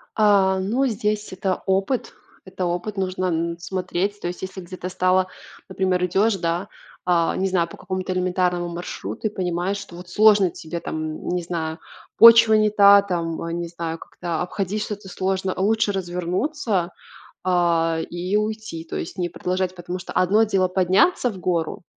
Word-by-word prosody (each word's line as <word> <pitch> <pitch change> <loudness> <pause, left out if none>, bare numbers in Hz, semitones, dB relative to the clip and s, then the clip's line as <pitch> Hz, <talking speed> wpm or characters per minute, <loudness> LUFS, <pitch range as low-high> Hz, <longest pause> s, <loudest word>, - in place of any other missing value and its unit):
А, 195 -3 +4
ну 235 +8 0
здесь 210 -2 -2
это 190 -1 -2
опыт. 195 +6 0 0.3
Это 185 -1 -4
опыт 180 +4 -3
нужно 185 -1 -1
н 170 0 -1
смотреть. 185 +3 -2
То - - -4
есть 175 0 -6
если 190 0 -6
где-то 180 +1 -7
встала, 185 0 +2 0.4
например, 185 -1 0
идешь, 195 +4 +2
да, 170 +2 -2 0.4
а, 170 -2 +2
не 195 - 0
знаю, 175 -2 +1
по - - -12
какому-то 185 0 -3
элементарному 180 -1 0
маршруту 175 +5 -5
и - - -2
понимаешь, 185 0 -2
что 175 -3 -10
вот 180 +1 -11
сложно 205 -2 +5
тебе 165 +2 -6
там, - - -5 0.3
н - - -8
не 180 0 0
знаю, 165 -1 -4 0.4
почва 230 -1 +9
не 215 0 +4
та, 200 -1 +7
там, 170 -4 -3
а, 165 - -4
не 170 0 -3
знаю, 165 -1 -5
как-то 170 -1 -5
обходить 195 +3 -2
что-то 205 -2 -6
сложно, 190 +1 -1
лучше 210 +2 +2
развернуться, 185 - -1 0.5
а, 170 -2 +2
и 180 +4 -2
уйти, 215 -6 -3
то - - -6
есть 170 - -5
не 175 -1 0
продолжать. 185 +2 -2
Потому 180 +1 -5
что 180 - -8
одно 205 +5 +3
дело 190 -3 +1
подняться 190 - +3
в 195 - -9
гору, 170 -2 -2
185 Hz, 170 wpm, -23 LUFS, 175-200 Hz, 0.5 s, почва